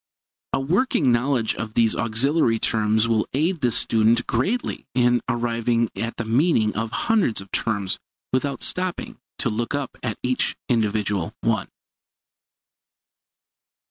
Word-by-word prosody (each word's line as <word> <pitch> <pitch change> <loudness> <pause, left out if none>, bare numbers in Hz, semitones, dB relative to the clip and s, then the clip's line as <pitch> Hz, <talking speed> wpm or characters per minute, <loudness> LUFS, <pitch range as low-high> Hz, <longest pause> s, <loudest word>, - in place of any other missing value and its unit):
A - - +2
working 160 - +2
knowledge 120 -1 +1
of 110 0 -6
these 115 -2 +3
auxiliary 115 +2 +1
terms 110 0 +1
will 115 -2 +1
aid 160 +4 0
the 125 - +3
student 115 +1 +2
greatly 195 - -1
in 120 -1 +3
arriving 115 -1 0
at 115 +4 -4
the 115 - -3
meaning 115 -2 +2
of 115 +1 -2
hundreds 195 - +1
of 95 0 -9
terms 100 -4 -1 0.3
without 135 +2 0
stopping 180 -6 -2 0.2
to 120 - +1
look 115 +5 -2
up 145 -2 -4 0.3
each 125 0 0
individual 105 -6 0
one. 110 -3 0
115 Hz, 125 wpm, -23 LUFS, 110-135 Hz, 0.3 s, these